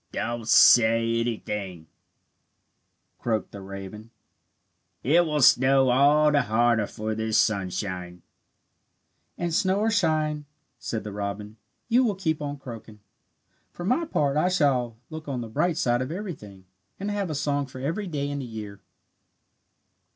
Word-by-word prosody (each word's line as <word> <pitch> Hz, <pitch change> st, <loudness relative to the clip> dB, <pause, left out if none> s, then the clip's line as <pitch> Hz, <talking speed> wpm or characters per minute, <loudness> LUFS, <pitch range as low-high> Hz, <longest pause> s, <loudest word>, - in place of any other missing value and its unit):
"Don't 120 Hz, -2 st, -4 dB
say 115 Hz, 0 st, +5 dB
anything," 105 Hz, -7 st, -4 dB, 1.3 s
croaked 110 Hz, -3 st, -2 dB
the 100 Hz, -, -9 dB
raven. 100 Hz, +3 st, -9 dB, 0.9 s
"It 170 Hz, +6 st, +4 dB
will 150 Hz, -2 st, +1 dB
snow 130 Hz, +1 st, +5 dB
all 145 Hz, +4 st, +4 dB
the 145 Hz, -1 st, +3 dB
harder 115 Hz, -2 st, +2 dB
for 110 Hz, +1 st, -4 dB
this 110 Hz, 0 st, 0 dB
sunshine." 90 Hz, -3 st, -2 dB, 1.1 s
"And 175 Hz, -1 st, -2 dB
snow 190 Hz, +2 st, +1 dB
or 225 Hz, +1 st, +2 dB
shine," 155 Hz, -6 st, 0 dB, 0.3 s
said 110 Hz, -, -4 dB
the 105 Hz, -, -6 dB
robin, 105 Hz, +1 st, -5 dB, 0.3 s
"you 245 Hz, +2 st, +4 dB
will 215 Hz, -5 st, 0 dB
keep 160 Hz, -5 st, -2 dB
on 145 Hz, 0 st, -4 dB
croaking. 115 Hz, -5 st, -11 dB, 0.7 s
For 175 Hz, -, -8 dB
my 255 Hz, -, +1 dB
part, 145 Hz, -, 0 dB
I 175 Hz, +4 st, +2 dB
shall 130 Hz, -9 st, +1 dB
look 155 Hz, -1 st, -8 dB
on 130 Hz, -3 st, -3 dB
the 115 Hz, -, -6 dB
bright 155 Hz, +8 st, 0 dB
side 120 Hz, 0 st, +1 dB
of 130 Hz, +3 st, -4 dB
everything, 130 Hz, -, -8 dB, 0.3 s
and 200 Hz, +2 st, -3 dB
have 200 Hz, -3 st, -2 dB
a 155 Hz, -, -3 dB
song 145 Hz, 0 st, -1 dB
for 130 Hz, -1 st, -10 dB
every 165 Hz, +10 st, -3 dB
day 145 Hz, -4 st, -3 dB
in 145 Hz, 0 st, -4 dB
the 135 Hz, -, -5 dB
year." 105 Hz, -4 st, -8 dB
130 Hz, 145 wpm, -25 LUFS, 110-155 Hz, 1.3 s, say